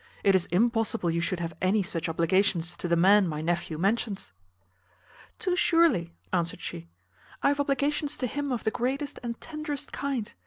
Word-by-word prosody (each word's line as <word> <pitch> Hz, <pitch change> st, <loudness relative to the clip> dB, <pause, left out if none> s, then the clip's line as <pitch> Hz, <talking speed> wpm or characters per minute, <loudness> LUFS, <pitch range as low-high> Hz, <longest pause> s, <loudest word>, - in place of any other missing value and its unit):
It 195 Hz, -, +5 dB
is 185 Hz, -2 st, +2 dB
impossible 225 Hz, -2 st, +1 dB
you 170 Hz, +1 st, 0 dB
should 175 Hz, +1 st, -1 dB
have 165 Hz, -1 st, -3 dB
any 195 Hz, +3 st, +3 dB
such 170 Hz, -2 st, -3 dB
obligations 170 Hz, +1 st, +1 dB
to -, -, -3 dB
the 170 Hz, -, +3 dB
man 195 Hz, +3 st, +5 dB
my 155 Hz, -2 st, -3 dB
nephew 170 Hz, 0 st, -1 dB
mentions." 200 Hz, -, -1 dB, 1.1 s
"Too 365 Hz, -1 st, 0 dB
surely," 330 Hz, -, +3 dB, 0.2 s
answered 170 Hz, -2 st, 0 dB
she, 85 Hz, 0 st, -7 dB, 0.5 s
"I -, -, +5 dB
have 285 Hz, 0 st, 0 dB
obligations 285 Hz, +1 st, 0 dB
to 255 Hz, -, -1 dB
him 285 Hz, +3 st, -2 dB
of 245 Hz, -, -2 dB
the 220 Hz, -, +1 dB
greatest 270 Hz, +5 st, -2 dB
and 235 Hz, -1 st, -5 dB
tenderest 305 Hz, -3 st, -5 dB
kind. 270 Hz, -6 st, -3 dB
205 Hz, 170 wpm, -28 LUFS, 170-275 Hz, 1.1 s, It